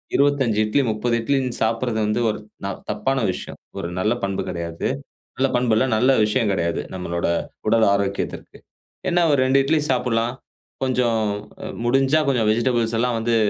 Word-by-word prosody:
25 140 Hz, -6 st, +2 dB
இட்லி, 110 Hz, +7 st, +2 dB
30 115 Hz, +3 st, 0 dB
இட்லினு 130 Hz, 0 st, 0 dB
சாப்பிடுறது 115 Hz, +1 st, 0 dB
வந்து 105 Hz, +2 st, 0 dB
ந -, -, +2 dB
ஒரு -, -, -6 dB, 0.5 s
தப்பான 135 Hz, 0 st, 0 dB
விஷயம். -, -, -7 dB, 0.2 s
ஒரு -, -, -3 dB
நல்ல 105 Hz, +5 st, +2 dB
பண்பு 100 Hz, -1 st, -1 dB
கெடையாது. 85 Hz, -1 st, -3 dB, 0.5 s
நல்ல 135 Hz, +1 st, +3 dB
பண்பு 125 Hz, -2 st, +2 dB
இல்ல. 110 Hz, -, +3 dB
நல்ல 125 Hz, +4 st, +4 dB
விஷயங்கெடையாது. 100 Hz, -7 st, 0 dB
நம்மளோட 85 Hz, -2 st, -2 dB, 0.4 s
உடல் 115 Hz, -1 st, +4 dB
ஆரோக்கியத்திற்கு. 100 Hz, 0 st, -3 dB, 0.5 s
என்ன 175 Hz, 0 st, +3 dB
ஒரு 140 Hz, -, +3 dB
2 135 Hz, +1 st, +4 dB
இட்லி 155 Hz, +3 st, +2 dB
சாப்புடலாம். 120 Hz, -2 st, +1 dB, 0.5 s
கொஞ்சம் 125 Hz, -3 st, +1 dB, 0.4 s
அ -, -, -4 dB, 0.2 s
முடிஞ்சா, 135 Hz, +4 st, +3 dB
கொஞ்சம் 120 Hz, -5 st, +2 dB
வெஜிடபிள்ஸ் 115 Hz, 0 st, +1 dB
எல்லாம் 125 Hz, -1 st, +1 dB
வந்து, 115 Hz, +1 st, +1 dB
115 Hz, 150 wpm, -22 LUFS, 105-130 Hz, 0.5 s, நல்ல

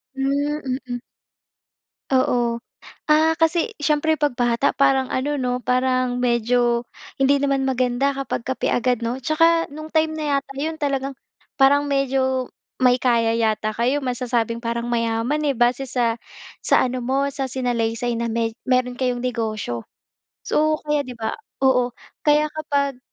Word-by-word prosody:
Hmm, 275 Hz, 0 st, -1 dB
mhm. 245 Hz, -1 st, -4 dB, 1.1 s
Oo. 240 Hz, -2 st, +2 dB, 0.5 s
Ah, 315 Hz, +1 st, +5 dB
kasi, 335 Hz, +7 st, +1 dB
siyempre 300 Hz, +1 st, +2 dB
'pag 295 Hz, -5 st, -1 dB
bata 240 Hz, +2 st, +2 dB
parang 270 Hz, -1 st, +3 dB
ano 285 Hz, +2 st, -1 dB
'no, 250 Hz, 0 st, 0 dB
parang 255 Hz, 0 st, +1 dB
medyo 240 Hz, 0 st, +2 dB, 0.3 s
hindi 275 Hz, +1 st, +3 dB
naman 275 Hz, -1 st, +1 dB
maganda 260 Hz, +1 st, +1 dB
kapag 270 Hz, -3 st, -4 dB
kape 260 Hz, -2 st, -1 dB
agad 245 Hz, -1 st, +1 dB
'no. 235 Hz, +2 st, -2 dB
Tsaka, 330 Hz, +5 st, +3 dB
nung 310 Hz, +1 st, -8 dB
time 315 Hz, 0 st, +1 dB
na 300 Hz, -3 st, 0 dB
yata 275 Hz, 0 st, -6 dB
yun, 315 Hz, +3 st, -2 dB
talagang 275 Hz, -3 st, -2 dB, 0.4 s
parang 285 Hz, +1 st, +4 dB
medyo 265 Hz, -2 st, 0 dB, 0.3 s
may 250 Hz, -1 st, +3 dB
kaya 230 Hz, -2 st, +2 dB
yata 220 Hz, -1 st, 0 dB
kayo. 255 Hz, +6 st, 0 dB
Masasabing, 240 Hz, -2 st, -1 dB
parang 235 Hz, 0 st, -2 dB
mayaman 230 Hz, +4 st, 0 dB
eh, 270 Hz, -, -1 dB
base 245 Hz, +2 st, +1 dB
sa 235 Hz, -2 st, 0 dB, 0.4 s
sa -, -, +3 dB
ano 255 Hz, 0 st, -3 dB
mo, 265 Hz, +3 st, 0 dB
sa 270 Hz, -2 st, -3 dB
sinalaysay 240 Hz, -1 st, -1 dB
na 235 Hz, 0 st, -2 dB
may 225 Hz, 0 st, -1 dB, 0.2 s
mayro'n 250 Hz, -1 st, +2 dB
kayong 250 Hz, -2 st, -1 dB
negosyo. 215 Hz, -, -2 dB, 0.6 s
So, 310 Hz, 0 st, +1 dB
kaya 295 Hz, -2 st, 0 dB
'di 250 Hz, -, -7 dB
ba? 220 Hz, -1 st, -2 dB, 0.3 s
Oo, 250 Hz, -2 st, +3 dB, 0.3 s
kaya 300 Hz, +1 st, +4 dB
kapag, 285 Hz, -3 st, -1 dB
255 Hz, 145 wpm, -22 LUFS, 240-280 Hz, 1.1 s, Ah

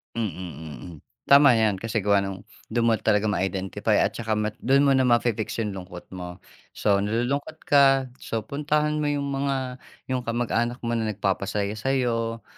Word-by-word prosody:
Mm, 115 Hz, -2 st, -1 dB
mm. 80 Hz, -2 st, -8 dB, 0.3 s
Tama 140 Hz, -2 st, +7 dB
yan. 110 Hz, -4 st, +2 dB
Kasi 110 Hz, -2 st, -2 dB
gawa 100 Hz, 0 st, +4 dB
nung 95 Hz, -1 st, -5 dB, 0.3 s
do'n 115 Hz, +1 st, +1 dB
mo 115 Hz, -, +4 dB
talagang 105 Hz, -1 st, +2 dB
ma-identify. 95 Hz, 0 st, -1 dB
At -, -, +1 dB
'tsaka 110 Hz, -2 st, -2 dB, 0.3 s
do'n 135 Hz, +3 st, +4 dB
mo 140 Hz, -, +4 dB
na 130 Hz, -1 st, +3 dB
ma-fix 120 Hz, -2 st, +1 dB
yung 105 Hz, -2 st, -3 dB
lungkot 90 Hz, -2 st, -9 dB
mo. 90 Hz, -1 st, -7 dB, 0.4 s
So, 100 Hz, -1 st, +2 dB
nalulungkot 125 Hz, +9 st, -2 dB
ka. 135 Hz, -2 st, +4 dB
So, 115 Hz, -1 st, -3 dB
puntahan 150 Hz, +3 st, 0 dB
mo 150 Hz, -, 0 dB
yung 140 Hz, -1 st, -1 dB
mga 135 Hz, -2 st, -2 dB, 0.3 s
yung 130 Hz, -, 0 dB
kamag-anak 120 Hz, 0 st, -1 dB
mo 120 Hz, -, -1 dB
na 110 Hz, -2 st, 0 dB
nagpapasaya 100 Hz, 0 st, -1 dB
sa'yo. 115 Hz, -3 st, -1 dB
115 Hz, 160 wpm, -25 LUFS, 100-135 Hz, 0.4 s, Tama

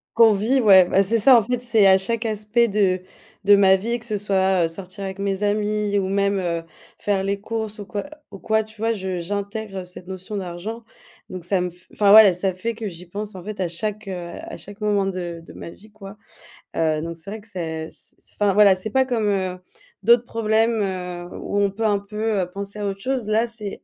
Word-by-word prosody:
Qu'on 225 Hz, -1 st, +7 dB
vit, 225 Hz, +7 st, +2 dB
ouais. 190 Hz, -5 st, +7 dB
Ben, 195 Hz, +2 st, +3 dB
c'est 225 Hz, +4 st, +1 dB
ça, 250 Hz, +4 st, +7 dB
en 225 Hz, -, +3 dB
fait, 245 Hz, +2 st, -2 dB
c'est 225 Hz, -4 st, +3 dB
à 190 Hz, 0 st, +7 dB
chaque 230 Hz, +4 st, -2 dB
aspect 220 Hz, +2 st, +1 dB
de 195 Hz, -3 st, +1 dB, 0.4 s
de 205 Hz, +1 st, +7 dB
ma 190 Hz, -1 st, +6 dB
vie, 235 Hz, +5 st, -2 dB
que 225 Hz, -, -8 dB
ce 215 Hz, -, -1 dB
soit, 190 Hz, -3 st, +1 dB
heu, -, -, +2 dB
sortir 185 Hz, +3 st, -7 dB
avec 190 Hz, 0 st, -6 dB
mes 200 Hz, 0 st, -2 dB
amis 210 Hz, 0 st, 0 dB
ou 190 Hz, -, -1 dB
même, 200 Hz, 0 st, +1 dB
heu, 170 Hz, -2 st, -2 dB, 0.4 s
faire 200 Hz, -2 st, 0 dB
les 200 Hz, +1 st, -1 dB
courses 220 Hz, 0 st, -4 dB
ou 205 Hz, -, -6 dB
quoi 205 Hz, +3 st, -5 dB, 0.3 s
ou 195 Hz, -, -10 dB
quoi, 220 Hz, +2 st, +1 dB
tu 220 Hz, 0 st, -17 dB
vois? 225 Hz, +1 st, +1 dB
Je 190 Hz, -3 st, -4 dB
j'intègre 200 Hz, +2 st, -4 dB
cette 180 Hz, 0 st, -11 dB
notion 190 Hz, +2 st, -6 dB
d'argent, 195 Hz, +6 st, -6 dB, 0.4 s
donc 185 Hz, -2 st, -7 dB
ça 185 Hz, +1 st, +1 dB
me 180 Hz, -, -1 dB
f 180 Hz, +1 st, -18 dB
enfin, 205 Hz, -1 st, +4 dB
voilà, 215 Hz, -2 st, +10 dB
ça 185 Hz, +2 st, -1 dB
fait 225 Hz, +6 st, -4 dB
que 220 Hz, -1 st, -5 dB
j'y 180 Hz, -1 st, -9 dB
pense, 205 Hz, +2 st, -6 dB
en 180 Hz, -, -8 dB
fait, 210 Hz, -1 st, -7 dB
à 180 Hz, -, 0 dB
chaque, 210 Hz, +4 st, -4 dB
heu, 190 Hz, -, -4 dB, 0.3 s
à 335 Hz, 0 st, -8 dB
chaque 205 Hz, +2 st, -11 dB
moment 205 Hz, -2 st, +1 dB
de 175 Hz, -3 st, -4 dB
de -, -, -12 dB
ma -, -, -9 dB
vie, 210 Hz, +5 st, -16 dB
quoi, 200 Hz, -1 st, -11 dB, 0.6 s
heu, 155 Hz, -1 st, +1 dB
donc 170 Hz, 0 st, -5 dB
c'est 170 Hz, +4 st, -9 dB
vrai 220 Hz, -, -6 dB
que 210 Hz, -, -15 dB
c'est 160 Hz, -5 st, -5 dB
c -, -, -10 dB
c -, -, -15 dB
enfin, 205 Hz, -2 st, +1 dB
voilà, 205 Hz, -2 st, +7 dB
c'est 185 Hz, +4 st, -4 dB
pas 265 Hz, +4 st, +2 dB
comme, 235 Hz, -5 st, -1 dB
heu, 185 Hz, -2 st, -1 dB, 0.4 s
d'autres 235 Hz, +1 st, +5 dB
problèmes, 225 Hz, -1 st, +1 dB
heu, 180 Hz, -2 st, -4 dB
où 205 Hz, -, -2 dB
on 200 Hz, -, +3 dB
peut 215 Hz, +3 st, -3 dB
un 205 Hz, -2 st, +2 dB
peu, 210 Hz, 0 st, -2 dB
heu, 180 Hz, -, -3 dB
penser 200 Hz, +2 st, -6 dB
à 205 Hz, -, -2 dB
autre 195 Hz, 0 st, -5 dB
chose. 255 Hz, -3 st, -2 dB
Là, 220 Hz, +2 st, +2 dB
c'est, 220 Hz, -4 st, -8 dB
200 Hz, 235 wpm, -22 LUFS, 185-215 Hz, 0.6 s, voilà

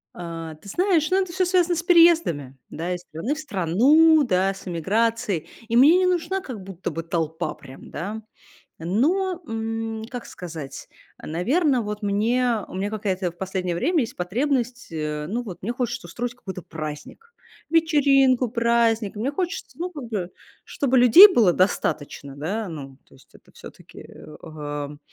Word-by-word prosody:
А, 165 Hz, -2 st, -7 dB
ты 180 Hz, +6 st, -14 dB
знаешь, 345 Hz, -, +1 dB
ну, 380 Hz, +1 st, +3 dB
это 375 Hz, -2 st, -4 dB
всё 370 Hz, +1 st, +1 dB
связано 360 Hz, -1 st, +2 dB
с 335 Hz, -, -3 dB
переездами, 330 Hz, -, +4 dB
да, 170 Hz, +3 st, -4 dB
из 180 Hz, -, -8 dB
страны 180 Hz, -, -4 dB
в -, -, -8 dB
страну, 290 Hz, -, +4 dB
да, 195 Hz, -5 st, +1 dB
с 195 Hz, 0 st, -13 dB
эмиграцией. 205 Hz, +2 st, -1 dB, 0.2 s
И 230 Hz, -, -1 dB
мне 295 Hz, +8 st, +7 dB
не 370 Hz, -, +2 dB
нужна 365 Hz, +2 st, 0 dB
как 235 Hz, -, -8 dB
будто 190 Hz, -1 st, -6 dB
бы 165 Hz, +1 st, -5 dB
толпа 165 Hz, -1 st, -2 dB
прям, 135 Hz, -1 st, -13 dB
да. 210 Hz, +7 st, -5 dB, 0.6 s
Но, 340 Hz, -, 0 dB
м, 225 Hz, 0 st, -4 dB
как 245 Hz, -2 st, -6 dB
сказать, 160 Hz, -6 st, -8 dB, 0.3 s
э, -, -, -9 dB
наверно, 255 Hz, -, +1 dB
вот 210 Hz, 0 st, -5 dB
мне, 225 Hz, +2 st, +1 dB
у -, -, -11 dB
меня 195 Hz, +2 st, -2 dB
какая-то 195 Hz, -4 st, -2 dB
в 170 Hz, -, -20 dB
последнее 185 Hz, -1 st, -3 dB
время 330 Hz, -, +1 dB
есть 230 Hz, -, -4 dB
потребность, 245 Hz, +6 st, -2 dB
э, 150 Hz, -2 st, -4 dB
ну 235 Hz, +6 st, -2 dB
вот, 195 Hz, -7 st, -8 dB
мне 225 Hz, +6 st, -2 dB
хочется 240 Hz, -7 st, -3 dB
устроить 240 Hz, +7 st, -4 dB
какой-то 190 Hz, -7 st, -8 dB
праздник, 160 Hz, -, -8 dB, 0.3 s
вечеринку, 275 Hz, -6 st, +3 dB
праздник. 230 Hz, -2 st, +1 dB
Мне 230 Hz, +6 st, -1 dB
хочется, 355 Hz, +3 st, -4 dB
ну, 355 Hz, +2 st, -3 dB
как 295 Hz, -7 st, -8 dB
бы 205 Hz, -6 st, -4 dB, 0.3 s
чтобы 265 Hz, -2 st, 0 dB
людей 250 Hz, -, +10 dB
было 220 Hz, -, +4 dB
достаточно. 145 Hz, -6 st, -1 dB
Да, 195 Hz, +9 st, -3 dB
ну, 135 Hz, -4 st, -8 dB
то -, -, -23 dB
есть 135 Hz, -, -22 dB
это -, -, -20 dB
всё-таки, -, -, -14 dB
э, 155 Hz, -, -13 dB
ам, 145 Hz, -2 st, -6 dB
220 Hz, 165 wpm, -23 LUFS, 175-280 Hz, 0.6 s, людей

